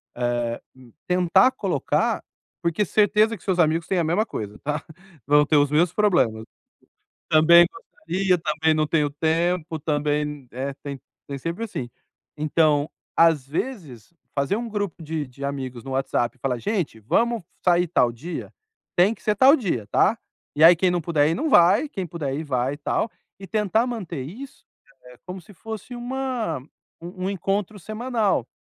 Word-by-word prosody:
Eh, 120 -1 -1
hum, 130 -3 -17 0.2
tentar 180 +7 +4
colocar - - -1 0.4
porque 170 +4 0
certeza 215 +3 +3
que - - -21
seus 185 -2 -1
amigos 165 0 +2
têm 190 - 0
a 170 - +2
mesma 175 +8 +1
coisa, 105 - -6
tá, 150 +1 -3 0.4
vão 145 +1 +5
ter 155 - +1
os 145 0 +3
mesmos 170 +3 +3
problemas. 175 - +2 0.9
Também 170 +2 +7
gostaria, 185 +3 -2
também 160 0 +1
não 155 0 +1
tenho 150 -2 +1
tempo, 165 +2 0
também 150 0 0
n 145 -3 -7
eh, 135 +2 -4
tem 140 -2 -6 0.3
tem 140 - -5
sempre 170 +10 -4
assim. 135 - -5 0.5
Então, 150 -1 +2 0.3
às 165 -5 +4
vezes, 155 - -5 0.2
fazer 140 +6 0
um 235 +1 -4
grupo 205 -6 -4
de 155 -2 -3
de 140 +2 -10
amigos 130 -4 -5
no 135 - -6
WhatsApp 130 -1 -1
e - - -33
falar: 125 -2 -1
"Gente, 175 - -2
vamos 230 - +1 0.2
sair 175 0 +4
tal 125 -7 +3
dia? 160 +9 -7 0.4
Tem 185 +5 +5
que - - -22
ser 210 - +1
tal 265 +7 +7
dia, 170 - -2
tá", 220 - +3 0.4
e 155 - +5
aí 170 +2 +10
quem 180 +2 +1
não 175 0 0
puder 150 -3 +2
ir 165 - +1
não 315 +4 -1
vai, 195 - +5
quem 190 - -5
puder 155 -5 -4
ir 155 - -4
vai 130 -1 -1
e - - -9
tal, 155 +8 -1 0.3
e 195 - -9
tentar 215 +3 +1
manter 190 - -5
isso, 230 - -10 0.4
eh, 125 0 -15
como 185 0 -7
se 205 - -17
fosse 220 +5 -8
uma 250 - -3 0.4
um 185 +2 -6
um - - 0
encontro 200 +1 -2
semanal. 215 - -1
165 Hz, 175 wpm, -23 LUFS, 145-200 Hz, 0.9 s, aí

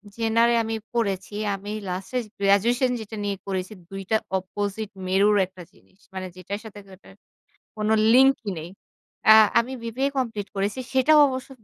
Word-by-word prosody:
genre 230 +1 +2
এ - - +3
আমি 225 0 -3 0.2
পড়েছি, 205 -4 -2 0.2
আমি 205 +2 -8 0.2
লাস্টে 190 +7 -4 0.2
graduation 230 +6 +3
যেটা 220 0 -8
নিয়ে 200 -1 -2
করেছি 190 +1 -3 0.2
২ 195 0 -6
টা 220 - +5 0.2
opposite 205 +3 -4 0.2
মেরুর 200 +3 +3
একটা 185 0 -14
জিনিস। 190 - -27 0.2
মানে 190 0 -5
যেটার 185 +3 -6
সাথে 210 -1 -10
যেটার 190 +1 -16 0.6
কোন 215 0 0 0.2
লিঙ্ক 265 +2 +6 0.2
নেই। 160 +2 -7 0.6
আ - - +11 0.3
আমি 240 +3 -3
বিবিএ 250 +4 -1
কমপ্লিট 225 -6 -2
করেছি। 200 +5 -2
সেটাও 265 +4 +5
অবশ্য 260 0 -5
210 Hz, 155 wpm, -24 LUFS, 195-235 Hz, 0.6 s, আ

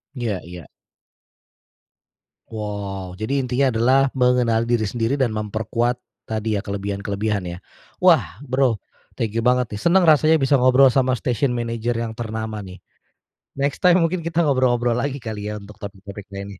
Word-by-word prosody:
Iya 115 -7 -2
iya. 85 -3 -10 1.8
Wow. 100 -4 -6
Jadi 135 +5 -1
intinya 130 +2 +1
adalah 130 +4 +4
mengenal 125 -3 +2
diri 115 -2 0
sendiri 120 +5 -1
dan 120 -5 +1
memperkuat 110 +3 -1 0.2
tadi 110 0 -2
ya, 100 - -1
kelebihan-kelebihan 100 +1 -3
ya? 85 -1 -6 0.4
Wah - - +3
Bro 130 -4 +1 0.4
thank 110 -2 -2
you 115 - 0
banget 125 -3 +1
nih 105 - -6
seneng 175 +3 +4
rasanya 155 +1 +5
bisa 135 +1 +3
ngobrol 130 +1 +6
sama 130 0 +2
station 125 +1 0
manager 115 -1 -2
yang 115 -1 -3
ternama 110 -2 -5
nih, 95 0 -11 0.8
next 140 0 -1
time 180 -1 +5
mungkin 170 +2 0
kita 170 +1 0
ngobrol-ngobrol 125 -4 +2
lagi 140 +2 -2
kali 110 -6 -6
ya 105 - -4
untuk 105 0 -11
topik-topik 100 0 -9
lainnya. 100 -1 -8
115 Hz, 150 wpm, -22 LUFS, 105-130 Hz, 1.8 s, ngobrol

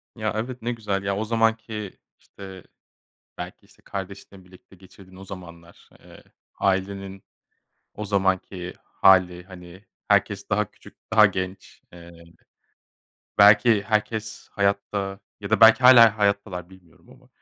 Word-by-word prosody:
Ya, 110 -2 -3
evet 120 +3 -5
ne 120 +2 -2
güzel, 105 -4 -3
ya, 100 0 -2
o 110 - -3
zamanki, 115 -2 -2 0.2
işte, 95 -2 -13 0.8
belki, - - -9
işte, - - -26
kardeşinle 100 0 -9
birlikte 90 +1 -19
geçirdiğin 95 0 -18
o 95 - -11
zamanlar, 85 -3 -13
eee, - - -17 0.4
ailenin 95 0 -2 0.7
o 105 - -6
zamanki 95 -2 -2
hâli, 90 -2 +3
hani, 95 +1 -14 0.2
herkes 100 0 0
daha 105 -1 -1
küçük, - - -18 0.2
daha 110 -1 +7
genç. 95 -1 -5
Eee, 85 -1 -13 1.3
belki 105 +1 +6
herkes 110 +1 -3
hayatta 100 0 -2 0.2
ya 100 0 -7
da 110 - +1
belki 115 +2 +7
hâlen 120 -3 +8
hayattalar 100 -4 -2
bilmiyorum 90 -3 -21
ama. - - -20
100 Hz, 125 wpm, -23 LUFS, 95-105 Hz, 1.3 s, hâlen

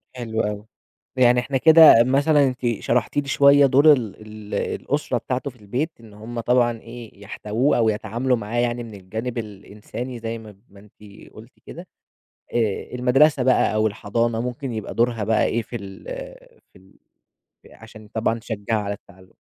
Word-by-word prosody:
حلو 115 -2 -3
أوي، 105 0 -4 0.5
يعني 125 -1 +5
إحنا 135 +2 -2
كده 160 -5 +8
مثلًا، 140 +3 +3
أنتِ 125 -1 -4 0.2
شرحتِ 120 +3 0
لي 140 -1 0
شوية 140 +1 +5
دور 140 +4 +6
ال 115 -7 -3
ال 105 -1 -11 0.3
الأسرة 145 -3 -2
بتاعته 130 +4 -3
في 125 - -16
البيت، 130 +11 -3
إن 110 -3 -16
هُم 115 +3 -8
طبعًا 120 0 +1
إيه 115 -3 -12
يحتَوُوه، 110 +6 -1
أو 115 -2 +3
يتعاملوا 115 +4 -1
معاه، 115 +2 -3
يعني، 120 0 -1
من 110 -2 -10
الجانب 110 +6 -6
الإنساني، 110 +3 -7
زي 115 0 -5
ما 110 -3 -13
ما 100 0 -17
أنتِ 105 0 -16
قلتِ 115 +3 -15
كده؟ 175 +2 -10 0.7
آآ، 115 +1 -2
المدرسة 130 +3 +3
بقى 130 -3 +2
أو 110 0 +2
الحضانة، 115 +3 -2
ممكن 125 +1 -5
يبقى 110 -2 -5
دورها 115 -2 0
بقى 110 +1 +2
إيه 115 - 0
في 115 - -10
ال 100 -4 -9 0.7
في 95 - -18
ال 95 +1 -24 0.6
ف - - -17
علشان 110 -1 -14
طبعًا 115 +1 -2
تشجّع 110 -1 -3
على 100 0 -3
التعلُّم؟ 95 -2 -17
115 Hz, 170 wpm, -22 LUFS, 105-125 Hz, 0.7 s, كده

